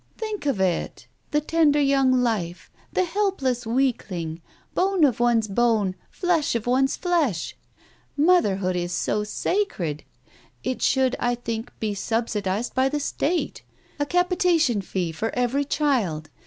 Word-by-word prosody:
"Think 430 -8 -4
of 265 -8 0
it! 185 -3 -1 0.2
The 295 - +1
tender 305 -1 +3
young 275 -2 +3
life, 185 -7 -2 0.2
the 370 - +2
helpless 330 - -1
weakling, 190 -10 -1 0.3
bone 380 -2 +2
of 255 -5 +3
one's 235 -2 +3
bone, 215 -2 +2 0.2
flesh 345 -8 0
of 230 - -2
one's 260 +2 +2
flesh.... 320 - 0 0.6
Motherhood 205 - +3
is 175 0 -2
so 210 +4 0
sacred 210 - -2 0.3
— 120 0 -31
it 255 - -2
should, 265 -1 +2
I 245 0 +1
think, 230 -1 -5
be 215 -2 -1
subsidized 210 0 -2
by 260 +1 +2
the 295 +1 -1
State. 320 +4 -1 0.4
A 290 - 0
capitation 355 - +2
fee 180 -2 -2
for 215 +8 -2
every 250 +3 +1
child. 220 - 0
245 Hz, 140 wpm, -24 LUFS, 205-300 Hz, 0.6 s, tender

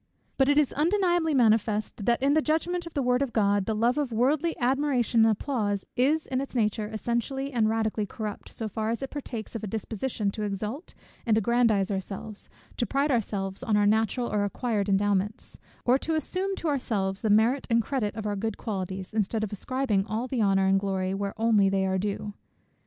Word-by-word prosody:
But 270 0 +3
it 290 - +4
is 300 -3 +3
undeniably 345 -1 +2
manifest, 215 -3 +2
that 235 0 +3
in 280 +1 +4
the 310 - +4
judgment 345 +3 -1
of 335 - -11
the 280 - +1
word 250 +1 +2
of 275 -4 -1
God, 200 -2 +2
the 220 - 0
love 235 +6 +2
of 280 -4 -1
worldly 285 +8 +1
admiration 250 -3 +2
and 225 - +5
applause 210 -4 -1
is 290 +5 +2
in 260 0 -1
its 275 - -7
nature 215 -2 0
essentially 235 +5 -2
and 220 -3 +2
radically 220 -1 0
corrupt; 215 0 -6
so 225 - -5
far 215 +1 -3
as 230 +4 -2
it 270 - -5
partakes 245 -6 -6
of 225 - -4
a - - -2
disposition 220 0 -2
to 215 - -6
exalt 210 - -4 0.3
and 220 -3 +2
aggrandize 220 -3 +2
ourselves, 195 +2 -5 0.3
to 240 - 0
pride 280 +2 +1
ourselves 195 -5 -1
on 225 -5 +1
our 205 - +3
natural 220 +3 +2
or 205 -1 0
acquired 205 0 -1
endowments, 205 +2 0 0.3
or 250 +2 +4
to 320 +3 -1
assume 370 +5 -1
to 335 - -4
ourselves 205 -9 -1
the 220 - 0
merit 225 +6 +3
and 230 -1 +3
credit 225 -4 -2
of 220 -1 -5
our 205 -1 -1
good 215 +1 -3
qualities, 190 -2 -4
instead 215 +1 0
of 215 - -3
ascribing 220 -1 0
all 220 +4 -2
the 255 -2 -1
honour 195 -2 +3
and 195 0 +4
glory 190 -1 -1
where 200 0 -3
only 215 -4 +4
they 195 0 +1
are 190 0 0
due. 205 +1 -3
225 Hz, 200 wpm, -27 LUFS, 205-265 Hz, 0.3 s, and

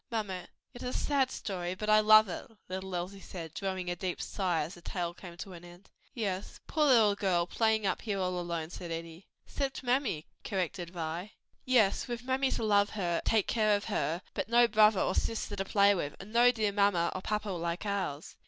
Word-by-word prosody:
"Mamma, 205 -6 -3 0.3
it 245 - -10
is 250 - -3
a - - +1
sad 275 -3 +1
story; 180 -6 -4
but 210 +3 -5
I 215 0 +6
love 215 0 +7
it," 180 - -6 0.2
little 190 0 -5
Elsie 180 +3 -4
said, 165 -4 -8
drawing 190 -1 -3
a 175 - -1
deep 180 0 -3
sigh, 180 -6 -1
as 160 - -6
the 175 - -13
tale 175 -1 -3
came 175 -1 -11
to 190 +2 -7
an 175 0 -11
end. 175 +2 -15 0.2
"Yes, 200 -5 -3
poor 305 -1 +1
little 230 -7 +6
girl, 185 -4 +1
playing 220 +2 +1
up 190 - 0
here 205 -3 -2
all 180 -1 -1
alone," 170 -2 -3
said 175 -2 -7
Eddie. 165 +2 -7 0.2
"'Cept 275 -2 -3
mammy," 245 - 0 0.2
corrected 180 -3 -2
Vi. 170 +3 -5 0.3
"Yes, 235 -6 +3 0.2
mammy 265 +1 +1
to 230 - -2
love 205 -1 +4
her 175 -5 -1
and - - -11
take 220 -3 +3
care 215 -2 +3
of 205 - -8
her, 165 -4 -1
but - - -3
no 240 0 +6
brother 215 -2 +5
or - - +1
sister 220 -2 -1
to 195 -1 -2
play 200 0 +5
with, 145 -6 -3
and 205 +3 -10
no 240 +1 +6
dear 215 -4 0
mamma 200 -4 +2
or 185 - -4
papa 210 +1 -2
like 170 +1 -3
ours." 190 -7 -3
195 Hz, 210 wpm, -31 LUFS, 175-215 Hz, 0.3 s, love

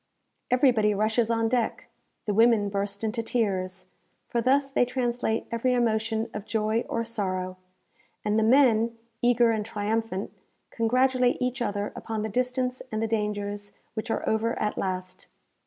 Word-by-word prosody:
Everybody 240 -5 +4
rushes 220 +2 +1
on 225 -1 +2
deck 235 -1 -1 0.4
the 210 - 0
women 225 -1 +4
burst 200 +1 -3
into 225 +1 -1
tears, 190 -5 -1 0.4
for 235 - 0
thus 275 +3 +2
they 270 - +3
translate 240 -2 -1
every 250 +2 +1
emotion 225 -1 +1
of 210 - -5
joy 220 +1 0
or 230 - -1
sorrow 185 -5 -3 0.7
and 210 +1 +2
the - - +2
men, 230 -1 +4 0.2
eager 240 -1 +4
and 220 -1 0
triumphant, 210 -1 -2 0.4
congratulate 250 +2 +2
each 250 +1 -1
other 205 -3 -2
upon 220 -2 -4
the 220 - -2
distance 250 +2 -1
and 215 - -1
the 225 - 0
dangers 205 -2 -2 0.2
which 220 0 -4
are - - -1
over 225 +1 +1
at 210 - -1
last. 185 -1 -4
225 Hz, 150 wpm, -27 LUFS, 210-240 Hz, 0.7 s, Everybody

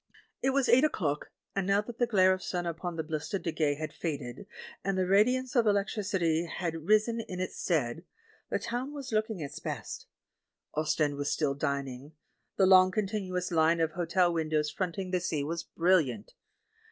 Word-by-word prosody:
It 265 - +2
was 270 -1 +2
eight 245 +4 +6
o'clock, 155 - 0 0.3
and 195 -1 0
now 200 +1 +4
that 235 +2 -10
the 240 - +3
glare 190 -4 +5
of 185 - -4
sun 175 -1 -3
upon 170 +1 -4
the 160 - -2
blistered 155 +5 -3
Digue 155 -4 0
had 155 -1 -5
faded, 145 0 -5 0.4
and 195 0 -1
the 185 - +2
radiance 250 +8 +3
of 235 -3 +4
electricity 195 -5 +1
had 165 -2 -4
risen 215 +2 +3
in 180 -1 -5
its 185 - -3
stead, 155 -2 0 0.5
the - - +1
town 250 +4 -4
was 275 -3 -7
looking 215 -3 -1
its 145 -1 -6
best. - - -6 0.7
Ostend 155 -1 +1
was 145 0 -1
still 145 -3 +1
dining. 140 0 -3 0.4
The 195 - +5
long 185 0 +7
continuous 190 -3 -2
line 165 0 +3
of 160 -1 +1
hotel 175 +1 +1
windows 155 -2 0
fronting 185 0 -3
the 180 - +2
sea 160 -5 -1
was 165 +3 -3 0.2
brilhant. 175 - +2
180 Hz, 175 wpm, -30 LUFS, 155-200 Hz, 0.7 s, long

